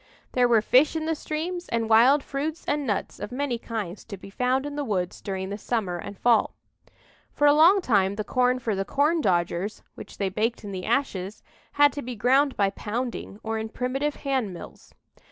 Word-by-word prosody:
There 250 -1 +3
were 230 -3 +4
fish 270 +8 +4
in 315 -1 -2
the 325 - 0
streams 335 +4 -4
and 230 -1 0
wild 245 +6 +5
fruits 300 +4 -4
and 290 -2 -1
nuts 205 - -2
of 205 +3 -6
many 255 -2 -2
kinds 215 -6 -5
to 200 - -8
be 195 +1 -12
found 255 +5 0
in 290 0 -5
the 290 - -2
woods 185 -8 -2
during 190 -2 -4
the 205 +1 -5
summer 200 -6 -2
and 200 - -8
fall. 235 -1 +2 0.8
For 290 - +1
a 290 - +7
long 345 +6 +6
time 200 - +2
the 215 - -3
corn 250 +3 +1
for 235 -4 -2
the 195 0 -1
"corndodgers" 205 - 0
which - - -11
they 195 -2 0
baked 225 +5 -1
in 205 - -6
the 185 -1 -5
ashes, 205 -7 -1 0.3
had 290 -1 +5
to 285 - -5
be 250 -1 -6
ground 265 +5 +2
by 200 -1 +2
pounding, 225 0 -5
or 225 0 -2
in 220 0 -4
primitive 270 +5 -2
hand 265 -7 -1
mills. 175 - -12
240 Hz, 200 wpm, -25 LUFS, 205-285 Hz, 0.8 s, a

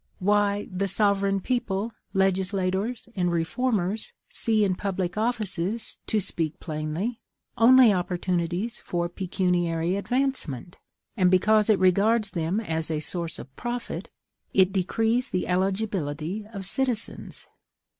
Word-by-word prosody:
Why! 205 +1 +1
the 190 +2 -1
sovereign 200 -1 +2
people, 230 -2 -1 0.2
legislators, 190 +3 0
and 175 -2 +1
reformers, 195 +4 -1 0.2
see 220 -2 +2
in 195 -2 +2
public 185 -2 -2
offices, 215 -2 -1
to 220 - +2
speak 165 -5 -2
plainly, 160 +9 -3 0.3
only 245 -1 +7
opportunities 180 +3 -1
for 175 -1 -2
pecuniary 175 -1 0
advancement. 200 - -2 0.4
And, 185 -5 +4
because 210 +4 +4
it 215 - +5
regards 200 +4 +3
them 170 +4 -1
as 160 -7 -2
a 155 -2 -1
source 170 +2 -2
of 135 - -11
profit, 240 0 -4 0.5
it 190 0 +5
decrees 225 +6 +1
the 185 - -1
eligibility 190 -1 -1
of 200 -3 -6
citizens. 240 +2 -2
195 Hz, 115 wpm, -26 LUFS, 175-220 Hz, 0.5 s, only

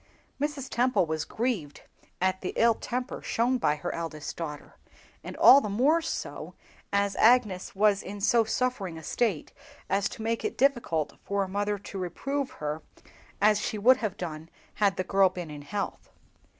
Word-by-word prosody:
Mrs. 290 -2 -2
Temple 250 -6 +2
was 160 -1 -2
grieved 215 - -3 0.4
at 185 0 0
the 185 - -4
ill 230 0 +5
temper 250 +3 -4
shown 245 +2 0
by 150 -8 +2
her 150 - -4
eldest 165 -3 -5
daughter, 150 -3 -7 0.5
and - - -8
all 275 - +9
the 210 - -3
more 275 +11 +3
so 325 - -5 0.4
as 200 0 +1
Agnes 220 -7 +3
was 205 0 +3
in 205 +1 -7
so 225 +3 +4
suffering 220 -7 -2
a 160 - -10
state 200 -3 -1 0.4
as 200 0 +2
to 220 - -8
make 230 +1 -1
it - - -3
difficult 240 - +1
for 200 0 0
a - - -4
mother 205 +2 -1
to 195 0 -8
reprove 270 - -3
her 150 +1 -5 0.6
as 210 0 +4
she 215 - -2
would 250 +5 +5
have 215 -5 -3
done 160 -2 -6 0.2
had 200 -2 +1
the 185 - 0
girl 195 0 +4
been 180 -4 -7
in 145 -1 -8
health. 200 +8 -5
200 Hz, 175 wpm, -28 LUFS, 175-240 Hz, 0.6 s, all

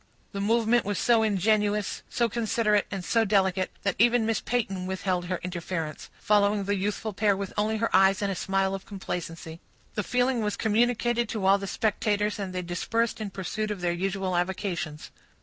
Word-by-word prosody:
The 200 - -4
movement 230 +3 +3
was 205 -1 -2
so 235 -2 +4
ingenuous, 210 0 +1
so 235 - +1
considerate, 220 -2 +1
and 190 -3 -5
so 230 -1 +3
delicate, 190 -3 +2
that 200 - 0
even 240 0 +4
Miss 225 -2 0
Peyton 195 -6 -2
withheld 185 -1 -1
her 180 0 -2
interference, 170 -3 -4
following 205 -1 +3
the 200 +1 0
youthful 205 +2 -2
pair 205 0 +2
with 195 -1 -5
only 215 +1 0
her 230 -2 0
eyes 195 +2 +4
and 200 - 0
a - - -2
smile 195 +1 0
of 195 - -6
complacency. 165 -4 -6 0.3
The 210 - -1
feeling 250 +2 +1
was 210 -1 -1
communicated 240 +1 +1
to 210 -4 -2
all 195 +1 +5
the 195 - -5
spectators, 210 0 0
and 195 -2 -3
they 185 0 -3
dispersed 225 +7 -1
in 210 - -3
pursuit 205 +3 -3
of 205 -3 -4
their 175 -1 +1
usual 190 +1 -2
avocations. 175 -4 -3
200 Hz, 185 wpm, -27 LUFS, 190-220 Hz, 0.3 s, all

